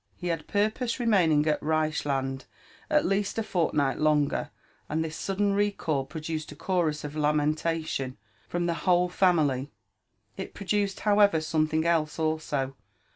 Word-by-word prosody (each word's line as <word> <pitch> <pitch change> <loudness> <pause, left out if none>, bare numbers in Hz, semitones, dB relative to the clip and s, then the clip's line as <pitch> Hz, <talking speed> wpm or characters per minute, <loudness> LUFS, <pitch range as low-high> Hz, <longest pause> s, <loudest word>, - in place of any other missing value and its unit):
He 175 - -4
had 165 -3 -2
purposed 220 +4 0
remaining 180 - +3
at 155 -1 +1
Reichiand 145 -4 -1 0.4
at 300 -1 +3
least 200 +2 0
a 225 - +1
fortnight 150 -8 0
longer, 150 -2 +2 0.4
and 160 +2 0
this 160 0 -5
sudden 200 +1 0
recall 195 -9 0
produced 155 0 -5
a - - -9
chorus 160 -2 -1
of 150 0 -6
lamentation 150 -2 0 0.3
from 175 0 -1
the 170 - +1 0.2
whole 180 0 +4
family. 155 -8 +2 0.7
It - - -6
produced, 200 0 -1
however, 205 -5 +4
something 155 0 0
else 160 -3 +1
also. 155 -4 -1
160 Hz, 135 wpm, -27 LUFS, 150-190 Hz, 0.7 s, whole